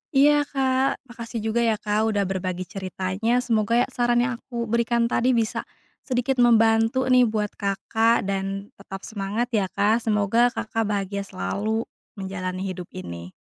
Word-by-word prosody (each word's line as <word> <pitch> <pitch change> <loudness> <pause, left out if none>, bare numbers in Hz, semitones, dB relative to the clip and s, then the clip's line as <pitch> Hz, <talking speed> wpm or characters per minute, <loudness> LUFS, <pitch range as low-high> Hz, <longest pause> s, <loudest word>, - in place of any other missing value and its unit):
Iya, 290 +1 +5
Kak, 265 0 0
makasih 235 -2 -7
juga 220 +1 0
ya, 230 -2 +2
Kak, 210 +1 0
udah 200 - +2
berbagi 185 -1 -3
ceritanya 190 +6 -2
semoga 230 -2 +1
ya - - -3
saran 240 0 +2
yang 250 0 0
aku 240 -2 -5
berikan 235 +1 +1
tadi 240 +2 +2
bisa 225 -2 -1 0.4
sedikit 255 0 0
membantu 225 +1 +4
nih 250 -1 +6
buat 215 -2 -1
Kakak, 220 +3 +1
dan 195 +1 -3
tetap 195 0 -9
semangat 215 +4 -3
ya 205 -5 +1
Kak, 205 +4 +2
semoga 220 +1 +2
Kakak 225 0 -1
bahagia 200 -1 -2
selalu 210 - -2 0.3
menjalani 190 -2 -4
hidup 185 -2 -5
ini. 85 -1 -7
220 Hz, 150 wpm, -24 LUFS, 195-240 Hz, 0.4 s, nih